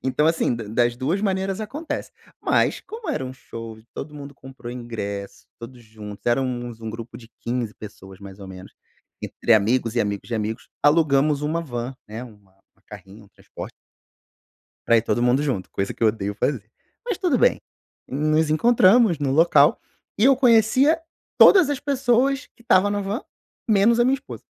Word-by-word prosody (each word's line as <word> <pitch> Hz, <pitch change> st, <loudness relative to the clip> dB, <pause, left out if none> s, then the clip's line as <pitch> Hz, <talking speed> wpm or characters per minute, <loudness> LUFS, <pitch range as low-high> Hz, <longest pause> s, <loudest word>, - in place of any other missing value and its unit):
Então 135 Hz, +3 st, +1 dB
assim 165 Hz, -6 st, +1 dB
da 115 Hz, -1 st, -6 dB
das 120 Hz, +3 st, 0 dB
duas 155 Hz, +10 st, -1 dB
maneiras 195 Hz, 0 st, -1 dB
acontece. 290 Hz, +10 st, -5 dB, 0.3 s
Mas -, -, +1 dB
como 445 Hz, -3 st, -9 dB
era 130 Hz, -, -2 dB
um 130 Hz, -, -6 dB
show 115 Hz, -3 st, -9 dB
que 110 Hz, -, -19 dB
todo 150 Hz, -, -7 dB
mundo 140 Hz, -1 st, -9 dB
comprou 130 Hz, -3 st, -10 dB
ingresso, 105 Hz, -5 st, -6 dB
todos 120 Hz, +1 st, -11 dB
juntos, 105 Hz, -2 st, -11 dB
éramos 120 Hz, -1 st, -1 dB
um 110 Hz, -1 st, -5 dB
grupo 115 Hz, +1 st, -9 dB
de 115 Hz, -2 st, -14 dB
15 120 Hz, -2 st, -3 dB
pessoas 95 Hz, -2 st, -12 dB
mais 100 Hz, 0 st, -11 dB
ou 100 Hz, -, -10 dB
menos, 95 Hz, 0 st, -11 dB, 0.5 s
entre 115 Hz, -, +1 dB
amigos 115 Hz, +2 st, +1 dB
e -, -, +3 dB
amigos 100 Hz, 0 st, -3 dB
de 120 Hz, -, -3 dB
amigos, 110 Hz, +1 st, -4 dB, 0.2 s
alugamos 145 Hz, -1 st, +3 dB
uma 160 Hz, +3 st, -1 dB
van, 120 Hz, -3 st, -5 dB
né, 110 Hz, +3 st, -7 dB
uma 100 Hz, -5 st, -18 dB, 0.3 s
carrinha, 100 Hz, +1 st, -12 dB
um -, -, -21 dB
transporte -, -, -10 dB, 1.2 s
pra 115 Hz, -, +5 dB
ir 110 Hz, -, +3 dB
todo 120 Hz, -, -1 dB
mundo 125 Hz, +4 st, +2 dB
junto, 125 Hz, -11 st, -2 dB
coisa 95 Hz, -, -3 dB
que -, -, -23 dB
eu -, -, +5 dB
odeio 105 Hz, -2 st, -2 dB
fazer. 125 Hz, -2 st, -1 dB, 0.4 s
Mas 475 Hz, -2 st, -3 dB
tudo 355 Hz, -8 st, +1 dB
bem, -, -, +3 dB, 0.5 s
nos 155 Hz, +3 st, +1 dB
encontramos 220 Hz, -, +4 dB
no 140 Hz, -2 st, -1 dB
local 150 Hz, -1 st, +4 dB, 0.4 s
e 210 Hz, -, +2 dB
eu 270 Hz, 0 st, +6 dB
conhecia 255 Hz, +5 st, +4 dB, 0.4 s
todas 370 Hz, -7 st, +7 dB
as 290 Hz, -2 st, -2 dB
pessoas 275 Hz, 0 st, +1 dB
que -, -, -21 dB
estava 205 Hz, -3 st, +4 dB
na 205 Hz, 0 st, -1 dB
van 205 Hz, -, -3 dB, 0.5 s
menos 220 Hz, +2 st, +4 dB
a 240 Hz, -, +4 dB
minha 260 Hz, +2 st, +3 dB
esposa. 275 Hz, +1 st, -9 dB
130 Hz, 180 wpm, -23 LUFS, -, 1.2 s, todas